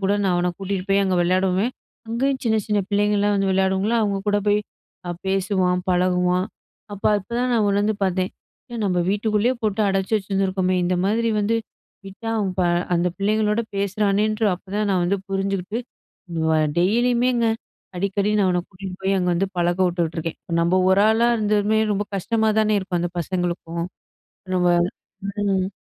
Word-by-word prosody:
கூட 195 +1 +2
நான் 185 - +2
அவன 175 0 +1
கூட்டிட்டு 195 -1 -3
போய் 200 0 +3
அங்க 190 -1 +1
விளையாடுவேன். 185 +6 +1 0.4
அங்கேயும் 265 +3 0
சின்ன, 220 -1 +2
சின்ன 210 -1 +1
பிள்ளைங்கள்லாம் 205 0 +2
வந்து 195 -1 +1
விளையாடுங்களா? 190 +4 +1
அவுங்க 200 -2 0
கூட 205 0 +3
போய் 205 0 +4 0.5
அ - - -1 0.2
பேசுவான், 185 -1 +1
பழகுவான். 180 +1 +2 0.5
அப்போ 205 - 0
இப்பதான் 240 +5 -2
நான் 215 -3 +2
உணர்ந்து 205 +2 +1
பார்த்தேன். 185 0 0 0.4
ஏன் 230 -2 -3
நம்ம 180 -2 +1
வீட்டுக்குள்ளயே 215 +4 +1
போட்டு 215 0 0
அடச்சி 195 +2 -1
வச்சிருந்துருக்கோமே! 190 -2 0
இந்தமாரி 200 +6 +1
வந்து 225 +3 +1 0.5
விட்டா 195 +4 -8
அவன் 195 -3 -1
ப - - +3 0.3
அந்த 175 +1 +2
பிள்ளைங்களோட 210 +2 +1
பேசுறானேன்ற 205 +2 +1
அப்பதான் 200 +3 -3
நான் 185 -2 +2
வந்து 195 +3 +1
புரிஞ்சுகிட்டு 195 +2 -2 0.8
அவ - - +3 0.2
டெய்லியுமேங்க. 240 +4 +2 0.5
அடிக்கடி 200 +2 0
நான் 195 - +3
அவன 180 -1 +1
கூட்டிட்டு 185 -1 -8
போய் 195 0 +1
அங்க 180 -1 0
வந்து 195 +3 +1
பழக்க 175 +1 +1
விட்டுட்ருக்கேன். 165 -2 -2
இப்ப 170 - -6
நம்ம 180 +2 +3
ஒரு 195 +2 +5
ஆளா 230 +2 +3
இருந்துமே 210 0 +2
ரொம்ப 205 +1 -1
கஷ்டமா 220 +3 +1
தான 215 0 +2
இருக்கும். 185 -2 -2
அந்த 175 0 -2
பசங்களுக்கும். 170 -1 -3 0.7
நம்ம 180 -1 +2 0.9
ம். 190 0 0
195 Hz, 155 wpm, -22 LUFS, 185-210 Hz, 0.9 s, ஒரு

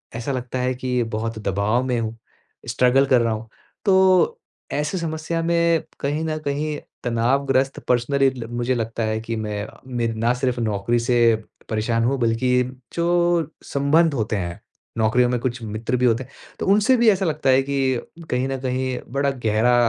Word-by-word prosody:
ऐसा 120 +4 -3
लगता 125 0 -3
है 125 +1 0
कि 125 -1 -1
बहुत 110 0 -3
दबाव 105 +5 0
में 125 -2 0
हूँ। 115 0 -3 0.5
स्ट्रगल 125 +3 +4
कर 130 -3 +4
रहा 115 -1 +1
हूँ। 110 0 -6 0.4
तो 190 - +4 0.3
ऐसी 150 +5 -1
समस्या 165 0 -2
में 170 -1 +2 0.2
कहीं 145 +3 -1
न 155 -1 -2
कहीं 150 +2 -1 0.3
तनावग्रस्त 130 +3 +1
पर्सनली 135 +3 +3
ल 125 -3 -7
मुझे 120 +1 -1
लगता 115 0 -2
है 110 0 -1
कि 115 0 -4
मैं 105 -1 -3 0.3
मेरे 115 -1 0
ना 115 +2 +1
सिर्फ़ 125 -1 -1
नौकरी 110 +2 0
से, 120 -1 +3 0.3
परेशान 115 +1 0
हूँ 135 +2 +1
बल्कि 125 +2 +2 0.3
जो 170 -2 +1
संबंध 150 +3 +2
होते 110 -3 -1
हैं, 85 -3 -4 0.4
नौकरियों 120 +3 +3
में 125 - 0
कुछ 120 0 -3
मित्र 110 +3 -2
भी 125 - +2
होते 120 +2 +2
हैं 130 - -18 0.3
तो - - -2
उनसे 210 +6 +4
भी 230 -1 +5
ऐसा 195 -2 +2
लगता 150 -4 0
है 130 +1 +5
कि, 135 -3 0 0.3
कहीं 125 +1 0
न 135 0 -2
कहीं 130 0 -1
बड़ा 140 0 +1
गहरा 120 -1 +2
125 Hz, 175 wpm, -22 LUFS, 115-140 Hz, 0.5 s, भी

